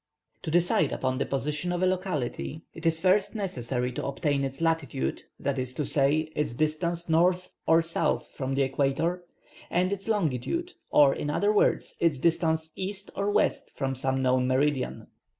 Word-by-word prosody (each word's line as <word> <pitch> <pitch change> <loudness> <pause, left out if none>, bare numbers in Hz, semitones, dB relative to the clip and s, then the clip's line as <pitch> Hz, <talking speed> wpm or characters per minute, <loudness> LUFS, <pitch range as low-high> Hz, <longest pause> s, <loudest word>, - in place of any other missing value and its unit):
To - - -5
decide 165 -3 +3
upon 130 0 -1
the - - -1
position 150 +5 -1
of 175 +1 -1
a - - +5
locality 175 -5 -2
it 165 0 -3
is 165 0 +2
first 190 +4 +3
necessary 125 - -2
to 125 - -4
obtain 140 0 0
its 135 0 -4
latitude, 165 -4 -1 0.2
that 140 -1 -1
is 130 0 -4
to 150 - -1
say, 145 +3 +2
its 150 -6 -1
distance 165 +4 -1
N. 170 +3 +4 0.3
or 165 - +6
S. 165 0 -1 0.4
from 135 0 -3
the 140 - +3
equator, 140 +6 0 0.5
and 185 +3 +1
its 195 +1 -6
longitude, 210 - -1 0.2
or 140 -2 +6
in 145 - -3
other 205 +8 +2
words 210 - +2
its 165 -4 +2
distance 160 +1 +1
E. 190 +1 -2 0.2
or 200 - -1
W. 210 +1 +4 0.2
from 135 -1 -1
some 130 0 -1
known 130 0 +2
meridian. 135 0 0
155 Hz, 170 wpm, -27 LUFS, 135-175 Hz, 0.5 s, or